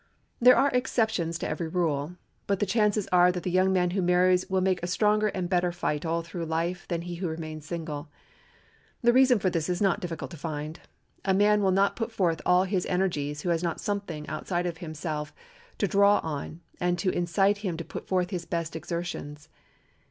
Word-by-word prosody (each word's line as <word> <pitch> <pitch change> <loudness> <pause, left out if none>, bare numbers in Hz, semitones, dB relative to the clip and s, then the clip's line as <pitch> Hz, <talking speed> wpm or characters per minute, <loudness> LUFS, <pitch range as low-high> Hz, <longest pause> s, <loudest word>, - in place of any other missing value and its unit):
There 250 +1 +8
are 280 - +3
exceptions 220 -9 0
to - - -3
every 170 - -3
rule; 160 -2 -1 0.3
but 200 -1 +1
the 205 - +2
chances 210 0 +2
are 180 0 +6
that 180 -1 -5
the 180 - -2
young 185 +1 +3
man 180 -2 +2
who 190 +1 0
marries 180 +1 +3
will 190 0 +2
make 185 -1 +1
a 175 - -3
stronger 210 +3 +2
and 185 -3 -2
better 180 -1 +1
fight 165 -2 -2
all 165 +1 0
through 170 0 -5
life 170 +3 -2
than 170 -2 -2
he 175 0 -6
who 180 0 -2
remains 155 -1 -6
single. 160 -3 -5 0.9
The 240 0 +5
reason 255 -2 +5
of 185 - +3
this 165 0 -1
is 180 -1 0
not 195 -1 +2
difficult 175 -4 -5
to 170 - -8
find. 155 +1 -5 0.4
A 190 -1 +2
man 210 +1 +4
will 195 - +3
not 195 +2 +2
put 230 0 -3
forth 170 -7 0
all 180 +1 +5
his 190 -1 -1
energies 150 -6 -1
who 175 - -2
has 165 -1 +1
not 170 -2 -2
something 200 -7 -4
outside 175 -1 -2
of 170 -2 -4 0.2
self 150 -2 -4 0.4
to 200 - +1
draw 200 +2 +5
him - - -5
on 155 +1 -5 0.2
and 175 0 +1
to 185 +2 0
incite 195 +4 +1
him 185 -6 -3
to 165 - -6
put - - -8
forth 180 -1 0
his 175 -3 -3
best 165 -2 -3
exertions. 160 -2 -5
180 Hz, 210 wpm, -27 LUFS, 165-195 Hz, 0.9 s, There